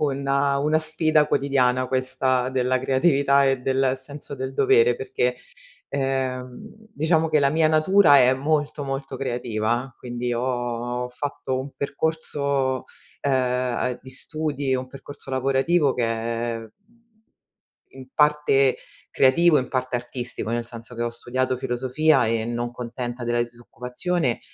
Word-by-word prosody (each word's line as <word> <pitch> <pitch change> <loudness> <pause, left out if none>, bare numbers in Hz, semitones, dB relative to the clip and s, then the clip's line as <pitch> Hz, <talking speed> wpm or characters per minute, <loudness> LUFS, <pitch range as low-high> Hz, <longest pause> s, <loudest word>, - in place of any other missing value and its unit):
una 140 0 +1
una 150 +2 +2
sfida 155 -1 +2
quotidiana, 130 -3 +1
questa 130 -1 0
della 130 0 +1
creatività 140 +1 +3
e 135 -1 +1
del 130 0 +1
senso 140 +2 -8
del 130 0 -5
dovere, 120 -3 +4
perché, 125 -1 -1 0.5
ehm, 130 -2 -3 0.2
diciamo 160 0 +1
che, 155 - +4
la 140 - +4
mia 155 +2 +3
natura 155 -1 +5
è 130 0 +5
molto, 145 +1 -1
molto 135 0 -4
creativa, 120 -1 -2
quindi 120 0 -4
ho 120 0 -2
fatto 130 0 -4
un 135 +2 -5
percorso, 140 -3 -1 0.4
ehm, 125 -2 +1
uhm, 125 -1 -3
di 130 - -10
studi 145 0 -2
un 130 0 -2
percorso 135 +1 -10
lavorativo 135 +3 +2
che 120 - 0
è 115 0 -2 1.3
in 130 -1 -12
parte 150 -3 +3 0.3
creativo, 150 +4 +4
in 130 - -3
parte 130 -1 -1
artistico, 120 -2 -5
nel 120 0 -1
senso 115 +1 -10
che, 120 - -3
ho 120 - 0
studiato 125 +2 -2
filosofia 130 +3 +1
e 110 0 0
non 120 +1 -3
contenta 120 0 -6
della 120 0 0
disoccupazione, 125 +5 -3
130 Hz, 130 wpm, -24 LUFS, 125-140 Hz, 1.3 s, natura